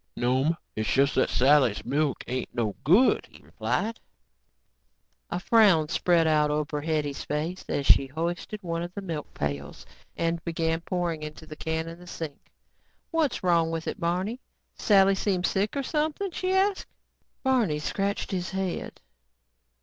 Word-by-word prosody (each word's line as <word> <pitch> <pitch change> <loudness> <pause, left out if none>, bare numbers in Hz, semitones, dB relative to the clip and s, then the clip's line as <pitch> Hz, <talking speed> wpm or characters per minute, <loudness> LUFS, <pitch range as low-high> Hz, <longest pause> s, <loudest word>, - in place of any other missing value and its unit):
"No'm, 130 +7 +1 0.2
it's 110 0 -1
just 140 +1 +3
that 130 - +2
Sally's 130 -5 +3
milk 140 +1 0
ain't 130 +1 -4
no 110 -4 -1
good," 195 - +4
he - - -17
replied. 225 +2 -2 1.3
A 175 - -2
frown 190 -7 +4
spread 170 -1 +3
over 150 -1 +1
Hetty's 150 -2 -1
face 160 +5 -3
as 140 - -1
she 135 - +6
hoisted 170 +8 -4
one 165 -1 -2
of 175 +1 -5
the 200 - -5
milk 160 -5 -5
pails 70 -1 -4 0.3
and 165 0 -1
began 165 -1 -1
pouring 175 -3 -2
into 155 +1 -8
the 155 - -9
can 160 +1 -3
in 165 +1 -8
the 180 - -13
sink. 160 -5 -7 0.6
"What's 310 - 0
wrong 170 -2 +3
with 165 0 -4
it, - - -3
Barney? 185 +9 -1 0.3
Sally 195 -2 +4
seem 190 -2 0
sick 200 +8 0
or 275 - -1
something?" 310 +7 -1
she 370 +2 -2
asked. 385 +1 +1 0.6
Barney 245 - +2
scratched 200 +7 -2
his 185 -1 -2
head. 190 -2 -4
165 Hz, 150 wpm, -27 LUFS, 150-195 Hz, 1.3 s, she